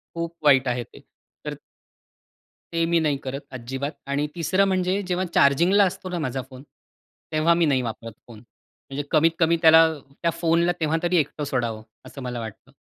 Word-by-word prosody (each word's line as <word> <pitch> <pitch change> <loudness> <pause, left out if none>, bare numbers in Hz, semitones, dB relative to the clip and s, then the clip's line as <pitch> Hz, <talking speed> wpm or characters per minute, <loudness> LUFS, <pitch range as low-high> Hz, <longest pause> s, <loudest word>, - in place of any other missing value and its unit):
खूप 170 0 -4
वाईट 135 -3 +5
आहे 120 0 -1
ते. - - -17 0.5
तर - - -4 1.2
ते 165 0 +1
मी 170 0 +2
नाही 150 -3 +1
करत, 135 +2 -5
अजिबात. 135 +3 -5 0.2
आणि 140 +2 -1
3रं 180 +4 +2
म्हणजे 185 +1 0
जेव्हा 185 +1 -1
चार्जिंगला 170 +9 +4
असतो 185 0 -4
ना, 180 - -3
माझा 130 -3 -2
फोन, 130 0 -12 0.7
तेव्हा 155 +2 +3
मी 170 -1 +2
नाही 135 -3 +2
वापरत 115 -1 -6 0.2
फोन. 115 -3 -12 0.5
म्हणजे 140 +2 -4
कमीत-कमी 165 +1 +3
त्याला 160 -1 +8 0.4
त्या 170 -1 +1
फोनला 170 +1 +1
तेव्हा 160 0 +1
तरी 175 0 +2
एकटं 150 0 -1
सोडावं, 120 -5 -2 0.2
असं 140 - -10
मला 125 -1 -4
वाटतं. 110 -2 -9
155 Hz, 170 wpm, -24 LUFS, 130-170 Hz, 1.2 s, त्याला